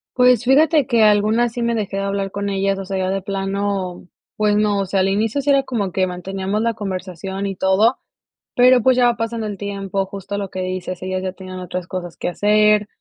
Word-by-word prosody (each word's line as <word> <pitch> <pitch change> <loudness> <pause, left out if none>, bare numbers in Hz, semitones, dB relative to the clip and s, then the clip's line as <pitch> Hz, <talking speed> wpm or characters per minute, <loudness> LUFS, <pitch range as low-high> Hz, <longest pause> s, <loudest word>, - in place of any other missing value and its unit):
Pues 250 -2 +4
fíjate 290 +2 +4
que 235 -4 +3
algunas 215 +3 +3
sí 240 - -4
me 235 0 +1
dejé 205 -3 -3
de 195 - -1
hablar 195 0 -2
con 200 0 -3
ellas, 195 0 0
o 195 - -4
sea, 190 0 -4
ya 185 0 -1
de 195 0 -1
plano, 195 -2 -3 0.3
pues 210 -1 +2
no, 210 -1 +2
o 195 - 0
sea, 190 +1 -1
al 190 - +2
inicio 215 +7 0
si 280 +1 -2
era 275 -1 +4
como 205 -9 -3
que 190 -1 +2
manteníamos 190 +3 -3
la 230 0 +1
conversación 190 -1 -5
y 195 -1 -3
todo, 190 +7 +3 0.6
pero 250 0 +6
pues 260 -1 +4
ya 245 -1 +4
va 240 - +2
pasando 230 -1 -3
el 200 -2 -6
tiempo 195 -1 -3
justo 200 +1 -6
lo 200 -1 -3
que 185 - -6
dices, 185 -1 -4
ellas 185 0 -3
ya 185 - -2
tienen 185 -1 -9
otras 180 0 -5
cosas 175 -2 -6
que - - -3
hacer. 210 +2 +3
200 Hz, 225 wpm, -20 LUFS, 190-220 Hz, 0.6 s, pero